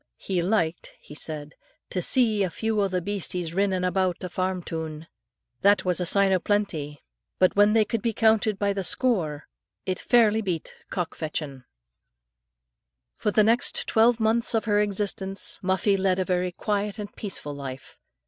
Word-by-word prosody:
"He 185 -3 -2
liked," 175 -3 -1
he - - -13
said, 150 -1 -4 0.4
"to 180 - -1
see 220 +1 +3
a 190 - +1
few 220 +3 -1
o' 200 - +2
the 180 -2 -2
beasties 180 -4 -3
rinnin' 190 -1 0
aboot 185 0 0
a 180 - -4
farm 185 0 -2
toon. 160 -1 -6 0.6
That 200 0 +4
was 180 -1 0
a 180 - -1
sign 200 +2 +4
o' 185 - +3
plenty; 165 -8 -2 0.3
but 185 - +3
when 205 +1 +5
they 220 -1 +4
could 225 +1 -2
be 235 - 0
counted 220 -1 +2
by 200 0 0
the 195 -1 -3
score, 170 - 0 0.4
it 185 -1 -2
fairly 225 -3 +3
beat 180 -6 -4
cock 180 -3 -3
fechtin." 150 -4 -5 1.5
For - - -2
the 215 +1 +4
next 230 +3 +2
twelve 230 +1 +3
months 230 +2 +1
of 225 - 0
her 205 -1 +2
existence, 195 -1 0
Muffie 190 +1 +1
led 190 -1 +1
a 185 - 0
very 180 0 0
quiet 205 +2 -2
and 205 -1 -7
peaceful 175 -8 -5
life. 135 -2 -8
190 Hz, 170 wpm, -25 LUFS, 175-210 Hz, 1.5 s, when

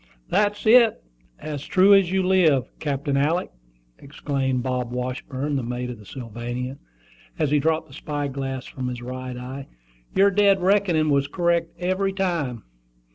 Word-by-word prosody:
"That's 205 0 +1
it, 230 0 +5 0.3
as 150 -2 -6
true 195 +1 +5
as 195 -3 +4
you 190 0 +1
live, 165 -9 +3
Captain 140 -1 -2
Alick!" 155 +6 +1 0.5
exclaimed 135 -3 -2
Bob 125 -2 -2
Washburn, 130 +3 -3
the - - -1
mate 125 +1 -4
of 120 - -9
the 105 - -14
Sylvania, 120 +2 -6 0.6
as 145 - 0
he 150 - +4
dropped 160 +2 0
the 135 - -16
spy 145 +1 -3
glass 135 -1 -4
from 130 -1 -5
his 120 -1 -5
right 130 0 -6
eye. 130 +2 -7 0.5
"Your 200 +1 +5
dead 200 -1 +4
reckoning 180 -5 +2
was 140 0 +2
correct 170 +1 0
every 185 +2 0
time." 170 - -2
145 Hz, 155 wpm, -24 LUFS, 130-180 Hz, 0.6 s, it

